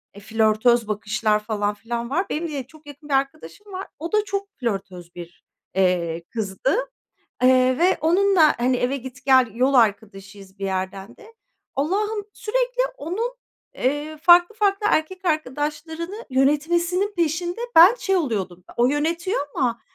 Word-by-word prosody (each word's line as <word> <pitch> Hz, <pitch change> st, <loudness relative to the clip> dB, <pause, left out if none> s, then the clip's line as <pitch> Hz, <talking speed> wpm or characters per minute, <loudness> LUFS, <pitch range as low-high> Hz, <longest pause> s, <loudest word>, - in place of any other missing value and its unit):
eee, 200 Hz, -, -11 dB
flörtöz 220 Hz, +2 st, +2 dB
bakışlar 215 Hz, 0 st, 0 dB
falan 210 Hz, -1 st, -2 dB
filan 235 Hz, +2 st, -5 dB
var. 350 Hz, +8 st, 0 dB
Benim 330 Hz, +3 st, -2 dB
de 285 Hz, -4 st, -4 dB
çok 305 Hz, +2 st, -19 dB
yakın 290 Hz, +1 st, -12 dB
bir -, -, -1 dB
arkadaşım 275 Hz, -, -3 dB
var. 375 Hz, +1 st, -5 dB
O 330 Hz, +2 st, -5 dB
da 425 Hz, -, +3 dB
çok 400 Hz, 0 st, -3 dB
flörtöz 195 Hz, -7 st, -5 dB
bir, 175 Hz, 0 st, -11 dB, 0.3 s
eee, 175 Hz, -3 st, +1 dB
kızdı. 220 Hz, +4 st, -1 dB, 0.7 s
Eee, 255 Hz, 0 st, +4 dB
ve 360 Hz, +2 st, +3 dB
onunla, 350 Hz, -1 st, +4 dB
hani, 250 Hz, +1 st, +2 dB
eve 250 Hz, +3 st, 0 dB
git 255 Hz, 0 st, -11 dB
gel 260 Hz, -2 st, +5 dB
yol 255 Hz, +4 st, +1 dB
arkadaşıyız 200 Hz, -4 st, -1 dB
bir 195 Hz, -, -3 dB
yerden 190 Hz, +3 st, -4 dB
de. 445 Hz, +1 st, -16 dB, 0.4 s
Allah'ım, 410 Hz, +9 st, -1 dB
sürekli -, -, -1 dB, 0.2 s
onun, 460 Hz, +6 st, -3 dB, 0.4 s
eee, 290 Hz, +4 st, -2 dB
farklı 350 Hz, +4 st, +6 dB
farklı 415 Hz, -1 st, +1 dB
erkek 370 Hz, +3 st, -1 dB
arkadaşlarını 310 Hz, -, -3 dB
yönetmesinin 340 Hz, +9 st, +1 dB
peşinde 345 Hz, +3 st, -1 dB, 0.2 s
ben 355 Hz, +8 st, +9 dB
şey 385 Hz, -5 st, 0 dB
oluyordum. 200 Hz, -, -2 dB
O 240 Hz, -, +4 dB
yönetiyor 335 Hz, +7 st, -1 dB, 0.2 s
ama 235 Hz, -2 st, 0 dB
275 Hz, 145 wpm, -22 LUFS, 215-345 Hz, 0.7 s, ben